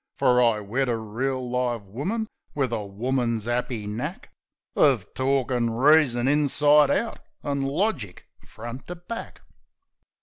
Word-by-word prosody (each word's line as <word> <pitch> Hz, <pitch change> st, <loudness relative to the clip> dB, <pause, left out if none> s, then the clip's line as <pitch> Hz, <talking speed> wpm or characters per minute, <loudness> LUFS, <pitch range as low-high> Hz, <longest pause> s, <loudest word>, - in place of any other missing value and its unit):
Fer 125 Hz, 0 st, +4 dB
I 115 Hz, -3 st, +3 dB
wed 120 Hz, +6 st, -1 dB
a 115 Hz, -, +1 dB
reel, 125 Hz, +4 st, -3 dB
live 120 Hz, -3 st, -1 dB
woman, 150 Hz, -, -3 dB, 0.3 s
wiv 135 Hz, -4 st, 0 dB
a 110 Hz, -2 st, -1 dB
woman's 115 Hz, +2 st, -1 dB
'appy 120 Hz, -2 st, -2 dB
knack 125 Hz, -, -5 dB, 0.4 s
Uv -, -, +4 dB
torkin' 130 Hz, -2 st, +1 dB
reason 130 Hz, 0 st, +4 dB
inside 145 Hz, 0 st, +4 dB
out 230 Hz, +1 st, 0 dB, 0.2 s
an' 140 Hz, -1 st, -1 dB
logic 135 Hz, -, -2 dB, 0.2 s
front 120 Hz, +3 st, -8 dB
to 180 Hz, -, -5 dB
back. 180 Hz, +7 st, -8 dB
125 Hz, 130 wpm, -25 LUFS, 115-145 Hz, 0.4 s, Fer